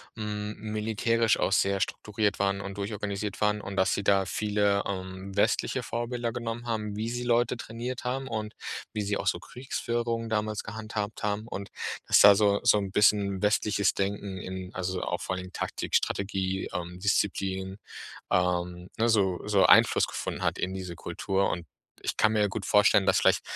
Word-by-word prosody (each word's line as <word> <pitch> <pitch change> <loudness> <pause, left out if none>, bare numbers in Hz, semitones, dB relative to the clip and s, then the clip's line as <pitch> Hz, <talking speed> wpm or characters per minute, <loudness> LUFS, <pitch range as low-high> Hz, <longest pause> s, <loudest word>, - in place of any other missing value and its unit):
hm, 105 -1 -4
militärisch 110 +1 +1
auch - - +1
sehr 95 0 +2
strukturiert 105 +1 -1
waren 100 0 0
und 100 0 -7
durchorganisiert 100 0 -4
waren 105 0 +2
und 100 - -6
dass 95 0 +3
sie 100 - -2
da 100 -1 +3
viele, 105 -1 +1
ähm, 95 0 -6
westliche 100 - +1
Vorbilder 120 0 -3
genommen 120 0 -5
haben, 105 -2 -2
wie 110 +2 -2
sie 120 +1 -3
Leute 120 0 +2
trainiert 120 +2 -5
haben 130 +2 -2
und 110 -2 -4 0.4
wie 105 - -2
sie 100 0 -1
auch - - -4
so - - +2
Kriegsführungen 120 -2 -3
damals 105 -1 -1
gehandhabt 110 -1 -5
haben. 105 +1 -1
Und 100 -4 -6 0.4
dass - - +6
da 100 -1 +9
so 100 -1 +3
so 115 -3 +5
'n 100 -2 -2
bisschen 100 -1 +3
westliches 105 -1 +2
Denken 100 -1 -2
in, 95 0 -6
also 95 0 -2
auch 90 - -2
vor - - -3
allen 95 - -3
Dingen 90 - -13
Taktik, - - -3
Strategie, 95 -1 0
ähm, 90 0 -5
Disziplin, 95 -1 -1 0.5
ähm, 90 0 0
ne, 115 0 +2
so 100 -5 +2
so 100 -2 +4
Einfluss - - +6
gefunden - - -4
hat - - +1
in 95 +1 -2
diese 90 -2 -6
Kultur. 95 0 -1
Und 85 - -3 0.4
ich - - -3
kann 110 0 +4
mir 105 - +2
ja 105 - +4
gut 100 0 -5
vorstellen, 105 -1 +5
dass - - +4
vielleicht - - +4
105 Hz, 180 wpm, -28 LUFS, 95-110 Hz, 0.5 s, da